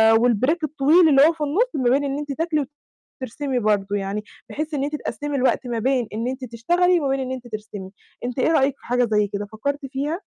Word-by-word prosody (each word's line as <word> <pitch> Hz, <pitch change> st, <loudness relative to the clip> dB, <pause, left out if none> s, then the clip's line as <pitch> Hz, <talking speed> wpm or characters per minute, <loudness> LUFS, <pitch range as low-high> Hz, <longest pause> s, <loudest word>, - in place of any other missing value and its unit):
والbreak 245 Hz, +6 st, +3 dB
الطويل 310 Hz, +3 st, +4 dB
اللي 275 Hz, -1 st, +6 dB
هو 330 Hz, -, +2 dB
في 320 Hz, -, -14 dB
النص 390 Hz, +13 st, +1 dB
ما 270 Hz, -, -1 dB
بين 275 Hz, +3 st, +3 dB
إن 275 Hz, 0 st, -2 dB
أنتِ 290 Hz, -1 st, -5 dB
تاكلي، 305 Hz, -1 st, -1 dB, 0.6 s
وترسمي 260 Hz, +1 st, -2 dB
برضه 205 Hz, -2 st, 0 dB
يعني، 200 Hz, +1 st, -3 dB, 0.3 s
بحيث 310 Hz, +1 st, -4 dB
إن 275 Hz, -2 st, -1 dB
أنتِ 295 Hz, +2 st, -2 dB
تقسمي 290 Hz, -1 st, -4 dB
الوقت 265 Hz, -1 st, +1 dB
ما 235 Hz, -2 st, -2 dB
بين 255 Hz, 0 st, +1 dB
إن 225 Hz, +3 st, -2 dB
أنتِ 260 Hz, 0 st, -4 dB
تشتغلي، 345 Hz, +10 st, +2 dB
وما 280 Hz, -4 st, -1 dB
بين 270 Hz, -, 0 dB
إن 260 Hz, -1 st, -3 dB
أنتِ 255 Hz, -2 st, -6 dB
ترسمي. 210 Hz, -4 st, -7 dB, 0.3 s
أنتِ 250 Hz, +1 st, -4 dB
إيه 315 Hz, -, +3 dB
رأيِِك 275 Hz, -3 st, +2 dB
في -, -, -19 dB
حاجة 245 Hz, 0 st, +1 dB
زي 210 Hz, -1 st, +3 dB
كده، 200 Hz, +1 st, -4 dB
فكرتِ 275 Hz, +7 st, -4 dB
فيها؟ 275 Hz, +3 st, -3 dB
265 Hz, 220 wpm, -22 LUFS, 230-295 Hz, 0.6 s, اللي